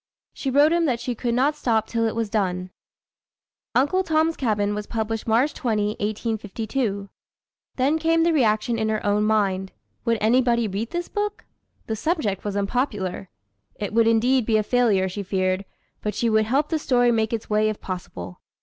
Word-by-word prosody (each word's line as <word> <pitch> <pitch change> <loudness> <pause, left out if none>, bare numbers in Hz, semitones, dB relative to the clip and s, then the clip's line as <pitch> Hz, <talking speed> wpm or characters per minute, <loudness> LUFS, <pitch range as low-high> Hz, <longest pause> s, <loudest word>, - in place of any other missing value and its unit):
She 270 - -3
wrote 290 +4 +5
him 340 -1 +2
that 250 -6 0
she 250 - -3
could 235 0 -2
not 280 +4 +2
stop 225 -6 +1
till 230 0 0
it 220 - -3
was 230 -1 -1
done. 185 -4 -1 1.0
Uncle 290 +10 +3
Tom's 320 -2 +1
Cabin 210 -5 0
was 210 0 -4
published 225 -1 -3
March 240 +7 +3
20,1852. 215 0 -2 0.7
Then 280 +5 +2
came 330 +1 +3
the 335 0 +3
reaction 230 -4 +2
in 220 0 0
her 215 -1 -2
own 205 +1 +2
mind. 195 -3 +1 0.3
Would 230 -1 +2
anybody 235 +1 +3
read 210 +4 -3
this 345 0 -3
book? 415 0 -3 0.4
The 220 - -2
subject 220 - -1
was 205 -1 -3
unpopular. 200 -4 -2 0.5
It 205 0 -5
would 230 0 +4
indeed 245 +3 +3
be 220 0 +2
a 215 - +1
failure, 210 -5 +2
she 190 +2 -5
feared, 185 0 -1 0.4
but 210 -2 -3
she 230 -1 +1
would 220 0 +3
help 275 +6 +1
the 320 - 0
story 245 -4 +3
make 220 -1 +1
its 230 -2 -3
way 215 0 +2
if 215 - -4
possible. 95 - -7
225 Hz, 175 wpm, -24 LUFS, 210-255 Hz, 1.0 s, wrote